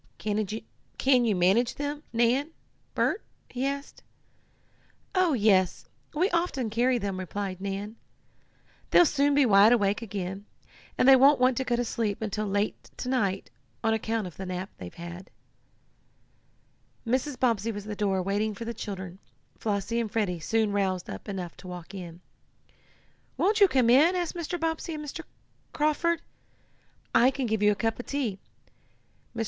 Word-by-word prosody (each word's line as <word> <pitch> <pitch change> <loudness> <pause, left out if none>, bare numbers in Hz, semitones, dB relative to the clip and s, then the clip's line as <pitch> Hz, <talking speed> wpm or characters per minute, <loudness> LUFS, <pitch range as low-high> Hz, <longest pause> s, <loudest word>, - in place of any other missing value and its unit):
Can 215 +4 -1
you 215 -3 +2
manage 195 +7 +3
them, 290 +1 -4
Nan 240 +5 +2 0.5
Bert?" 410 - +1 0.3
he 255 +2 -1
asked. 280 0 -5 1.1
"Oh, 370 -4 +3
yes, 200 -6 +2 0.3
we 350 +5 +3
often 335 -10 0
carry 245 +3 +2
them," 200 -4 -3
replied 190 0 -4
Nan. 200 +3 -4 0.9
"They'll 350 - +7
soon 285 -1 +2
be 285 -1 +5
wide 205 0 +6
awake 205 -2 +1
again, 195 -2 -5 0.5
and - - +3
they 270 - +10
won't 275 +2 +6
want 255 0 +4
to 265 - +1
go 245 -2 0
to 240 0 -1
sleep 220 -3 -2
until 215 -1 -2
late 200 +1 -2
to 250 - -4
night, 200 - -1 0.3
on 225 - +2
account 220 -1 -1
of 180 - -9
the 190 - -5
nap 185 +2 -4
they've 90 -1 -7
had." 175 +2 -9 1.8
Mrs. 255 +3 -1
Bobbsey 230 -3 +1
was 205 -1 -7
at - - -9
the 210 - -3
door 195 -3 0
waiting 205 +2 -1
for 230 - -6
the 235 - -3
children 190 -4 -7 0.4
Flossie 210 +2 -1
and 230 -2 -1
Freddie 200 -6 -1
soon 220 +5 +1
roused 190 -3 -1
up - - -8
enough 185 -4 -5
to 180 +1 -12
walk 180 +1 -8
in. 175 -3 -8 1.2
"Won't 420 +3 +2
you 400 - +8
come 255 -8 +3
in?" 310 +8 +6
asked 350 -2 -1
Mrs. 345 0 -4
Bobbsey 325 0 -2
of 305 - -5
Mr. 300 +3 -7 0.5
Carford. 315 +3 +1 0.9
"I 245 - +6
can 270 -1 -2
give 220 -2 -1
you 210 0 +5
a - - 0
cup 225 +2 -1
of 245 - -7
tea. 245 -9 -2 1.0
Mr. - - -5
225 Hz, 165 wpm, -27 LUFS, 195-265 Hz, 1.8 s, they